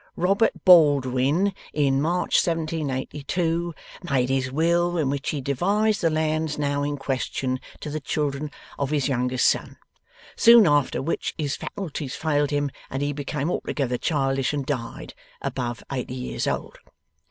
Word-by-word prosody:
Robert 195 +6 +1
Baldwin, 145 +1 +5 0.2
in 140 -2 +2
March 175 +4 +2
1782, 165 +1 -2 0.3
made 130 -2 +2
his 130 -1 0
will, 170 +4 +2
in 145 -5 +1
which 140 -1 -2
he 145 - -2
devised 200 - +1
the 165 - +3
lands 155 -1 0
now 145 -1 0
in 145 0 -2
question, 130 -1 -2 0.2
to 150 - -5
the 155 - -2
children 145 0 -2 0.3
of 140 -1 0
his 145 -3 +1
youngest 125 -1 0
son; - - +1 0.6
soon 230 -2 +8
after 145 -4 +2
which 165 - -2
his 145 -3 -1
faculties 155 -9 -5
failed 145 -2 +1
him, 145 -1 0 0.2
and 135 +2 -2
he 145 0 -1
became 145 +2 -3
altogether 125 -8 -2
childish 135 -3 0
and 140 -2 -2
died, 125 -4 -4 0.3
above 120 -2 -4
eighty 130 -1 -3
years 125 -1 -3
old. - - -3
145 Hz, 145 wpm, -24 LUFS, 135-165 Hz, 0.6 s, soon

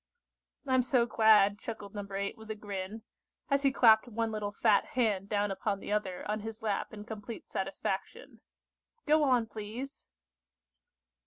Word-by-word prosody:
"I'm 260 -2 +3
so 250 -1 +2
glad," 210 -3 +5
chuckled 210 -4 -7
No. 205 -1 -4
8 200 +1 -2
with 220 -1 -13
a 220 - -3
grin, 205 +1 -6 0.5
as 280 0 +3
he 275 -1 +3
clapped 225 -3 +6
one 225 -1 -2
little 210 -1 -3
fat 205 0 +3
hand 205 -5 +1
down 205 -1 +1
upon 200 +1 -2
the - - -7
other 195 -4 -2
on 210 +1 -1
his 225 +1 -7
lap 205 -3 -1
in 210 -1 -8
complete 220 +1 -8
satisfaction. 195 - -4 0.6
"Go 310 +1 +4
on, 250 -5 +3
please." 225 +5 -7
215 Hz, 155 wpm, -31 LUFS, 205-235 Hz, 0.6 s, clapped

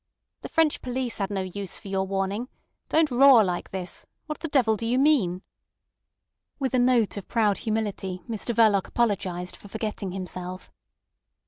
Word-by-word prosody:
"The - - -7
French 320 -2 +2
police 250 -2 -3
had 195 -1 -1
no 200 -2 -2
use 190 +1 -4
for 205 - -12
your 195 0 -1
warning. 195 +5 -2 0.4
Don't 315 -2 +3
roar 255 -2 +7
like 180 -2 -2
this. 185 -2 -6 0.2
What 305 -1 -5
the 330 - -4
devil 250 -7 +3
do 225 +2 -3
you 245 +2 +2
mean?" 235 - +2 1.1
With 265 -2 -2
a 255 - +3
note 245 -4 +3
of 200 - -7
proud 215 -4 +2
humility 205 -5 -3
Mr 230 +1 -3
Verloc 215 -4 +4
apologised 185 -6 -1
for - - -14
forgetting 210 -2 -4
himself. 185 -1 -6
215 Hz, 160 wpm, -26 LUFS, 190-245 Hz, 1.1 s, roar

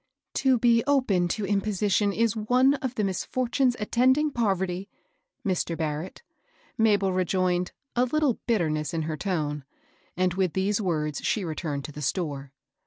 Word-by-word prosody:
" - - -62
To 260 -2 +4
be 230 -1 +4
open 235 -11 +2
to 200 +4 -2
imposition 205 0 +1
is 230 +1 +1
one 250 +5 +3
of 255 -2 -3
the 215 - 0
misfor 200 +6 -1
tunes 255 -3 +2
attending 260 +7 +2
poverty, 190 -5 -1 0.6
Mr. 175 -3 -1
Barrett," 160 - -4 0.5
Mabel 205 -4 +3
re 185 0 +2
joined, 180 0 0 0.2
a 250 +1 +3
litde 295 -2 +1
bitterness 155 - 0
in 160 - -1
her 155 0 -3
tone; 150 -6 -2 0.5
and 185 -1 +2
with 185 -2 0
these 200 +3 0
words 150 -6 -1
she 205 -4 0
returned 155 -3 -3
to - - -7
the 150 - -8
store. 140 -2 -2
195 Hz, 160 wpm, -26 LUFS, 170-230 Hz, 0.6 s, To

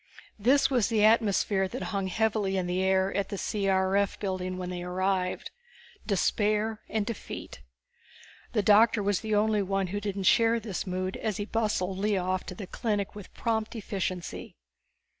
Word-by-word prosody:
This 265 +7 +4
was 245 -6 +3
the 215 -2 +3
atmosphere 205 -3 +3
that 245 +7 -5
hung 195 -1 0
heavily 205 0 0
in 185 - 0
the 180 +1 -1
air 190 0 +2
at 200 -1 -1
the 200 - -4
C.R.F. 195 0 +1
building 185 -2 -3
when 180 0 -4
they 180 -1 -4
arrived. 185 +1 -1 0.6
Despair 210 +2 +1
and 215 -2 0
defeat. 215 - -7 0.9
The 210 -3 +2
doctor 215 +1 +5
was 200 -1 +1
the 215 -1 -1
only 210 0 +2
one 195 0 0
who 205 - -2
didn't 200 -1 -3
share 230 +4 +4
this 210 -3 -5
mood 185 +1 -2
as 215 -4 -2
he 205 - -3
bustled 210 -4 -1
Lea 205 0 +1
off 185 0 -1
to - - -6
the 205 - -6
clinic 205 0 -2
with 205 -2 -10
prompt 225 -1 -1
efficiency. 185 -6 -4
200 Hz, 165 wpm, -28 LUFS, 190-215 Hz, 0.9 s, doctor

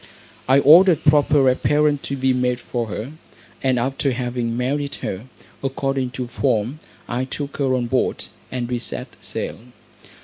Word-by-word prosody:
I 135 - +6
ordered 170 +3 +7
proper 145 -2 +4
apparel 145 +3 +2
to 140 - -4
be 130 0 +2
made 125 -1 0
for 120 -1 -3
her; 110 +5 -5 0.5
and 130 -2 +2
after 135 +2 0
having 120 -2 -2
married 140 +3 -1
her, 95 +5 -4 0.4
according 135 -1 -1
to 125 - -2
form, 115 +3 -1 0.3
I 125 +2 -1
took 140 +2 -5
her 135 -2 +1
on 125 -1 0
board, 125 +2 0 0.3
and 125 -2 -3
we 120 0 -2
set - - -4
sail. - - -4
130 Hz, 150 wpm, -21 LUFS, 120-140 Hz, 0.5 s, ordered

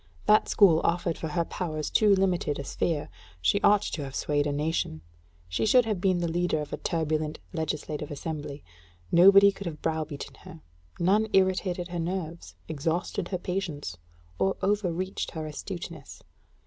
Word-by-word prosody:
That 215 - +4
school 170 -6 +5
offered 170 -1 +1
for 160 - -5
her 170 +2 -1
powers 155 -5 -4
too 210 -2 +5
limited 180 -6 +1
a 140 - -4
sphere: 150 +2 -1 0.3
she 80 0 +2
ought 205 0 +5
to 150 - -3
have 135 -1 -7
swayed 145 0 0
a - - 0
nation; 145 - -1 0.5
she 85 - -2
should 245 +2 +5
have 210 -5 -2
been 185 -2 +3
the 175 -1 -1
leader 175 -1 0
of 150 - -6
a - - -2
turbulent 155 -2 -1 0.2
legislative 155 -2 -3
assembly. 145 -1 -5 0.5
Nobody 195 +3 +8
could 195 -1 -7
have 155 -3 -7
browbeaten 155 -3 -3
her, 180 -4 -12 0.4
none 205 +5 +3
irritated 185 -2 +1
her 175 0 -4
nerves, 170 -1 -4
exhausted 165 +4 -2
her 185 - -2
patience, 175 - -4 0.4
or 195 - +1
overreached 190 -2 -1
her 160 -1 -4
astuteness. 165 0 -7
170 Hz, 160 wpm, -28 LUFS, 155-190 Hz, 0.5 s, Nobody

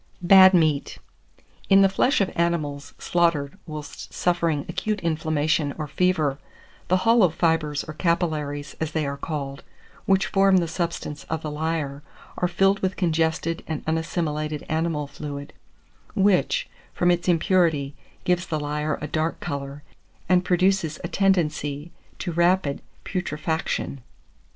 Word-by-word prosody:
BAD 190 +1 +8
MEAT. 155 -4 +1 0.7
In 195 0 +7
the - - +7
flesh 230 +7 +2
of 195 - +1
animals 155 -4 -1
slaughtered 165 -4 +1
whilst 150 -2 -8
suffering 170 -4 0
acute 215 -1 -2
inflammation 155 -2 0
or 155 -2 -4
fever, 155 -5 +1 0.5
the 185 - +3
hollow 225 -5 +5
fibres, 160 -3 0
or 155 - -8
capillaries, 155 -4 -1
as 160 -1 -3
they 155 -2 0
are 140 0 -3
called, 140 -2 -5 0.5
which 195 0 +3
form 195 -1 +4
the 170 -2 +1
substance 165 -4 -4
of 160 -1 -4
the 155 - -3
lyer, 150 -2 -2 0.4
are 180 - +2
filled 195 +3 +2
with 185 -1 -1
congested 165 -1 0
and 160 -2 -4
unassimilated 155 -2 -2
animal 160 -2 -1
fluid, 145 0 -7 0.6
which, 205 - +2 0.3
from 175 0 +3
its 175 0 -1
impurity, 165 -5 +2 0.3
gives 180 0 0
the 155 - -2
lyer 150 +1 -2
a - - -2
dark 160 +1 -1
colour, 140 -1 -5 0.4
and 180 -1 +4
produces 185 -3 +1
a - - -2
tendency 155 -5 0 0.3
to 175 - -4
rapid 170 -3 +2 0.2
putrefaction. 160 -5 -3
160 Hz, 135 wpm, -24 LUFS, 150-180 Hz, 0.7 s, BAD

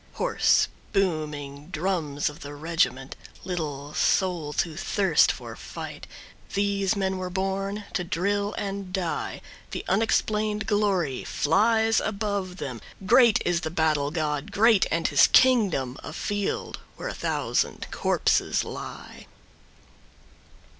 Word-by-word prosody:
Hoarse, - - +3 0.3
booming 150 -7 -1
drums 160 -5 -1
of 150 +2 -5
the 145 -2 -8
regiment, 145 -4 -1 0.3
Little 150 -5 -4
souls 175 -4 +1
who 165 -2 -5
thirst 190 -1 +3
for - - -8
fight, - - -8 0.5
These 200 0 +1
men 190 -1 -1
were 185 0 -3
born 195 +2 -2
to 180 - 0
drill 200 +4 -1
and 195 -2 -4
die. 185 -3 -3 0.3
The - - -5
unexplained 215 +1 +1
glory 195 - +1
flies 220 +8 +2
above 200 -3 -2
them, 130 -9 -5 0.2
Great 235 +1 +5
is 175 -1 +1
the 160 - -3
battle 155 -3 +1
god, 150 -2 -2
great, 220 -1 +4
and 165 +1 +1
his 145 - +6
kingdom 195 - +3
A 155 - -8
field 205 +2 -3 0.2
where - - -6
a - - -4
thousand - - -1
corpses - - +1
lie. - - -8
185 Hz, 120 wpm, -26 LUFS, 155-200 Hz, 0.5 s, his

